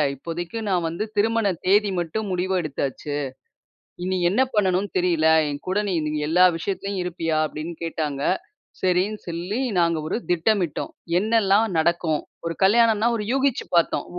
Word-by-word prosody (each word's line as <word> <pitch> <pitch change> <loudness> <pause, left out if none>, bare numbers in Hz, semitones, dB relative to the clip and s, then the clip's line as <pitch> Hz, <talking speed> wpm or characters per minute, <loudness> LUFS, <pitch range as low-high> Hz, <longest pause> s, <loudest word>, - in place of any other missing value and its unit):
இப்போதைக்கு 170 - -5
நான் 180 -3 +1
வந்து 170 +6 -3
திருமண 225 +1 +2 0.2
தேதி 205 +2 +4
மட்டும் 195 +5 -3
முடிவு 185 +1 -1
எடுத்தாச்சு. 145 -1 -4 0.9
இனி 185 +1 0
என்ன 210 - +1
பண்ணனுன்னு 195 -1 +1
தெரியல! 170 -3 +2 0.2
என் 145 0 -4
கூட 190 +3 +1
நீ 185 - 0 0.3
எல்லா 180 +3 +5
விஷயத்துலயும் 195 +3 -3
இருப்பியா?" 165 -3 -2
அப்பிடின்னு 155 +3 -6
கேட்டாங்க. 150 -4 -3 0.6
சரின்னு 185 +3 +1
சொல்லி 175 +7 -3 0.2
நாங்க 170 -1 +2
ஒரு - - -1
திட்டமிட்டோம். 175 -1 0 0.3
என்னெல்லாம் 215 0 +3
நடக்கும்? 160 -1 +1 0.3
ஒரு 165 - -2
கல்யாணன்னா 225 +2 +4
ஒரு 210 - -3
யூகிச்சு 270 -1 +1
பார்த்தோம். 170 - +2
180 Hz, 135 wpm, -23 LUFS, 165-205 Hz, 0.9 s, எல்லா